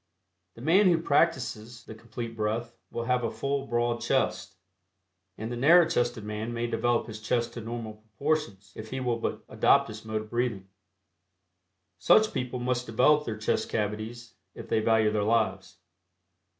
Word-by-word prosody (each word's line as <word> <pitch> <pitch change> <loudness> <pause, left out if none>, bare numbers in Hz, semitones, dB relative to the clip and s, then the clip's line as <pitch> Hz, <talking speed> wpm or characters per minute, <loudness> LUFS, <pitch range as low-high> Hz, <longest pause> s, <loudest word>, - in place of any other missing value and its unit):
The 115 - -11
man 185 +7 +5
who 175 -2 +4
practices 125 -7 0
the - - -10
Complete 115 +1 -7
Breath 115 +2 -2
will 115 - -4
have 125 +1 0
a 115 - 0
full 140 0 -3
broad 120 0 0
chest, 95 -8 -1 0.8
end 110 +2 -5
the - - -3
narrow 160 +7 +6
chested 120 -6 -1
man 105 +2 -4
may 115 0 -1
develop 120 0 0
his 110 -1 -9
chest 120 +2 -1
to 120 - -6
normal 115 -1 -6
proportions 110 -2 -3
if 110 0 -8
he 130 - -4
will 120 -2 -1
but - - -3
adopt - - +3
this 110 0 -9
mode 110 -1 -3
of 110 - -16
breathing. 120 -5 -2 1.3
Such 215 - +4
people 125 0 -3
must 125 0 -1
develop 150 +7 +3
their 110 -2 -4
chest 110 - -1
cavities 110 +2 -4 0.2
if - - -9
they - - +1
value 110 -1 +3
their 105 -1 0
lives. 100 -4 0
115 Hz, 165 wpm, -28 LUFS, 110-125 Hz, 1.3 s, narrow